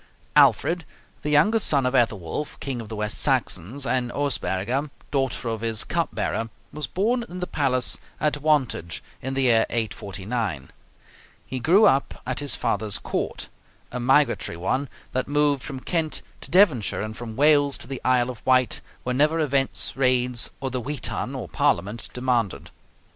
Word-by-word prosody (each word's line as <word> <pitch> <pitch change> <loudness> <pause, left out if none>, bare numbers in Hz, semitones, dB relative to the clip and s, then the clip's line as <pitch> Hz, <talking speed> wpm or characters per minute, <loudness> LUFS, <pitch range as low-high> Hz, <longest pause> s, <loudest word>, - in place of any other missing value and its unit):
Alfred, 170 0 +4 0.4
the 150 - -3
younger 160 +10 +4
son 140 -9 +2
of 125 - +1
Ethelwulf, 115 - 0
king 130 -4 -3
of 110 - -10
the 110 - -5
West 105 0 -3
Saxons, 125 +11 0
and 125 -2 0
Osberga, 135 -1 -1 0.2
daughter 135 -3 -1
of 110 -1 -3
his 115 -2 +1
cup - - -1
bearer, 115 0 -2 0.2
was 150 -3 -3
born 235 +6 0
in 180 +1 -7
the 180 - -2
palace 130 - +1 0.2
at 150 -1 0
Wantage 135 - 0 0.2
in 135 +1 -3
the 135 - +1
year 115 -3 +4
849. 100 - -3 0.7
He 130 +1 -4
grew 185 - +5
up 135 +1 +2
at 130 0 -2
his 145 -1 0
father's 105 -2 +1
court, - - -3 0.4
a 125 - -4
migratory 135 - +2
one, 130 +10 -1 0.2
that 130 - -1
moved 145 -1 +2
from 130 +4 -6
Kent 160 +2 -1 0.2
to - - -9
Devonshire 165 - +3
and 110 0 -5
from 115 -2 -7
Wales 145 0 +4
to - - -11
the 135 +1 -6
Isle 125 -1 +3
of 120 - -13
Wight 130 -1 +3 0.2
whenever 150 +6 +2
events, 140 -3 +1
raids, 125 -2 +2
or 135 -1 -3
the 125 0 -2
Witan 130 -3 -3
(Parliament) 100 +9 0
demanded. 125 -5 -1
130 Hz, 160 wpm, -24 LUFS, 115-145 Hz, 0.7 s, grew